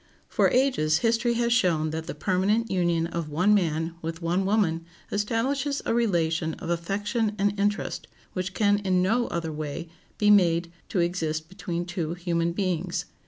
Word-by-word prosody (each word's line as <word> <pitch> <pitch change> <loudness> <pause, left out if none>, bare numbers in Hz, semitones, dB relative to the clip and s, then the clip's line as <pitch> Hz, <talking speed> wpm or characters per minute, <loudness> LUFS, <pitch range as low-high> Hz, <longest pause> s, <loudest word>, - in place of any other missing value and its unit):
For - - +3
ages 250 - +2
history 235 +1 +2
has 235 0 +2
shown 165 -9 +2
that 160 +1 -4
the - - -5
permanent 205 +5 +1
union 170 -3 +1
of 170 -2 -4
one 180 +8 +3
man 165 -4 +1
with 165 0 -4
one 175 +3 0
woman 190 -6 +1 0.3
establishes 265 +7 0
a - - +1
relation 165 -8 +1
of 170 - -5
affection 205 +6 -1
and 200 0 +2
interest 205 +1 -1 0.3
which 185 0 -3
can 205 -1 +3
in 185 -3 +1
no 235 +6 +2
other 165 -1 -3
way 155 +2 -5 0.3
be 210 -1 +4
made 170 -4 +4 0.2
to 180 - +1
exist 160 -2 -1
between 175 -2 -4
two 175 -2 -3
human 170 -1 0
beings. 185 -2 -1
180 Hz, 165 wpm, -26 LUFS, 165-210 Hz, 0.3 s, be